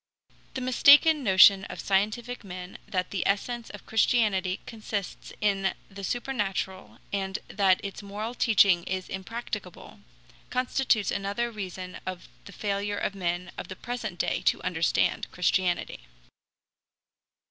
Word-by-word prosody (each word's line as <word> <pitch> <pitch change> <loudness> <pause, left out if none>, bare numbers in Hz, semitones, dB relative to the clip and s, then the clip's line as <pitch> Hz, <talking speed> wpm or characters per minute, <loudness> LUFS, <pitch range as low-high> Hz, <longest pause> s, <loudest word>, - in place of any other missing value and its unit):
The 260 - -3
mistaken 285 +4 +6
notion 195 -1 +7
of - - -8
scientific 215 +5 -1
men 180 -1 -8
that 185 -1 -2
the 195 - -1
essence 230 +4 -1
of 205 - -11
Christianity 210 -5 +2
consists 215 -3 -5
in 195 -2 +1 0.2
the 195 0 -9
supernatural, 195 - -3 0.2
and 195 0 -1
that 195 -2 +3
its 200 - -6
moral 210 +3 -5
teaching 200 -7 +4
is 185 0 -3
impracticable, 205 -1 -6 0.5
constitutes 250 -4 +1
another 200 +4 -2
reason 185 -3 -6
of 185 -1 -6 0.2
the - - -10
failure 205 0 -2
of 200 - -1
men 175 -2 -3
of - - -6
the 185 - -7
present 225 -4 -5
day - - 0
to - - +3
understand 170 -2 +1
Christianity. 180 0 0
200 Hz, 125 wpm, -27 LUFS, 185-225 Hz, 0.5 s, notion